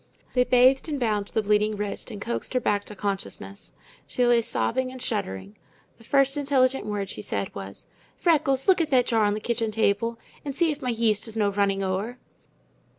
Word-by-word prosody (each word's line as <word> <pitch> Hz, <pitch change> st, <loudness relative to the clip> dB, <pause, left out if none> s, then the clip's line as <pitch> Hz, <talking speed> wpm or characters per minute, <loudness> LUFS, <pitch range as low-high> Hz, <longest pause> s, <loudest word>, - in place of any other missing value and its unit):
They 250 Hz, -1 st, +3 dB
bathed 255 Hz, +4 st, +4 dB
and 290 Hz, -2 st, -2 dB
bound 210 Hz, -4 st, 0 dB
the 220 Hz, -, -1 dB
bleeding 210 Hz, +1 st, +2 dB
wrist 205 Hz, +3 st, -4 dB
and 215 Hz, -4 st, -7 dB
coaxed 235 Hz, +4 st, -4 dB
her -, -, +4 dB
back 205 Hz, -4 st, 0 dB
to 210 Hz, -, -9 dB
consciousness. 135 Hz, -, -5 dB, 0.4 s
She 250 Hz, -, +1 dB
lay 240 Hz, -1 st, +4 dB
sobbing 255 Hz, +3 st, -1 dB
and 260 Hz, -, -9 dB
shuddering. 100 Hz, -, -3 dB, 0.4 s
The -, -, -16 dB
first 275 Hz, +3 st, +2 dB
intelligent 270 Hz, -4 st, +1 dB
word 205 Hz, -2 st, -2 dB
she 105 Hz, -, -6 dB
said 100 Hz, -1 st, -3 dB
was: 100 Hz, 0 st, -8 dB, 0.3 s
"Freckles, 285 Hz, -6 st, +2 dB
look 375 Hz, -3 st, +5 dB
at 320 Hz, -, -1 dB
that 255 Hz, -3 st, +4 dB
jar 225 Hz, -3 st, +2 dB
on 205 Hz, 0 st, +1 dB
the -, -, -3 dB
kitchen 230 Hz, 0 st, -1 dB
table 220 Hz, +1 st, 0 dB, 0.3 s
and 280 Hz, -2 st, -5 dB
see 335 Hz, 0 st, +2 dB
if 300 Hz, 0 st, -6 dB
my 250 Hz, -, -2 dB
yeast 225 Hz, -2 st, +1 dB
is 225 Hz, 0 st, -4 dB
no 205 Hz, -2 st, +2 dB
running 195 Hz, -1 st, +1 dB
ower." 195 Hz, +6 st, -2 dB
225 Hz, 200 wpm, -25 LUFS, 205-255 Hz, 0.4 s, look